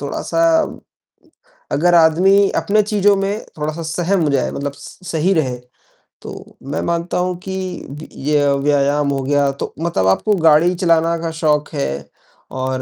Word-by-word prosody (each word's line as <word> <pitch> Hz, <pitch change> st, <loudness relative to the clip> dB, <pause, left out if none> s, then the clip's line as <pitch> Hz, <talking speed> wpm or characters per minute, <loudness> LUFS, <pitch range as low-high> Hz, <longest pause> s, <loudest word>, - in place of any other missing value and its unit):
थोड़ा-सा 165 Hz, +3 st, -2 dB, 1.3 s
अगर 175 Hz, +4 st, +3 dB
आदमी 185 Hz, +5 st, +4 dB
अपने 215 Hz, +1 st, +2 dB
चीज़ों 205 Hz, -1 st, +2 dB
में 200 Hz, +2 st, -2 dB, 0.2 s
थोड़ा-सा 155 Hz, +2 st, -4 dB
सहम 170 Hz, 0 st, 0 dB
जाए 135 Hz, -3 st, 0 dB
मतलब 140 Hz, 0 st, -4 dB
स 140 Hz, +6 st, -13 dB
सही 165 Hz, +5 st, +1 dB
रहे 130 Hz, -7 st, -1 dB, 0.6 s
तो -, -, -11 dB
मैं -, -, -2 dB
मानता 170 Hz, +1 st, -2 dB
हूँ 180 Hz, 0 st, -1 dB
कि 190 Hz, -, -3 dB, 0.5 s
य -, -, -8 dB, 0.2 s
ये 145 Hz, -1 st, +2 dB, 0.2 s
व्यायाम 145 Hz, 0 st, +1 dB
हो 135 Hz, -1 st, -1 dB
गया 140 Hz, 0 st, +1 dB
तो 135 Hz, -, -6 dB
मतलब 165 Hz, -, 0 dB
आपको 205 Hz, -, +2 dB
गाड़ी 165 Hz, +3 st, +5 dB
चलाना 170 Hz, -2 st, +2 dB
का 165 Hz, -1 st, -3 dB
शौक 150 Hz, -2 st, 0 dB
है 140 Hz, -, -1 dB, 0.6 s
और 130 Hz, 0 st, -3 dB
160 Hz, 150 wpm, -18 LUFS, 145-175 Hz, 1.3 s, गाड़ी